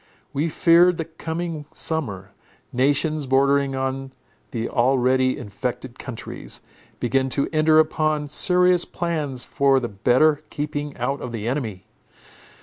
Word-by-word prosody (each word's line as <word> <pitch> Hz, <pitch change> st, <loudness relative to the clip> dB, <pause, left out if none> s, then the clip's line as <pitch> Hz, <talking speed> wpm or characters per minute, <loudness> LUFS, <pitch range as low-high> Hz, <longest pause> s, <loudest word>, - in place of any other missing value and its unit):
We 155 Hz, +4 st, 0 dB
feared 170 Hz, +2 st, +5 dB
the 165 Hz, -, -3 dB
coming 160 Hz, -1 st, -5 dB
summer. 105 Hz, -, -3 dB, 0.4 s
Nations, 145 Hz, +3 st, +1 dB
bordering 140 Hz, +1 st, +2 dB
on 135 Hz, 0 st, -3 dB, 0.4 s
the 115 Hz, -1 st, -3 dB
already 130 Hz, +1 st, +2 dB
infected 125 Hz, +2 st, -5 dB
countries, 125 Hz, -4 st, -7 dB, 0.4 s
began 135 Hz, +2 st, +1 dB
to 140 Hz, +2 st, 0 dB
enter 155 Hz, 0 st, +4 dB
upon 155 Hz, -1 st, +2 dB
serious 180 Hz, +3 st, +3 dB
plans 150 Hz, -7 st, -2 dB
for 140 Hz, -2 st, +3 dB
the 120 Hz, -2 st, -4 dB
better 130 Hz, +9 st, +3 dB
keeping 145 Hz, -1 st, -4 dB
out 140 Hz, 0 st, -2 dB
of 125 Hz, -, -5 dB
the 115 Hz, -1 st, -4 dB
enemy. 115 Hz, -8 st, -3 dB
140 Hz, 125 wpm, -23 LUFS, 125-155 Hz, 0.4 s, feared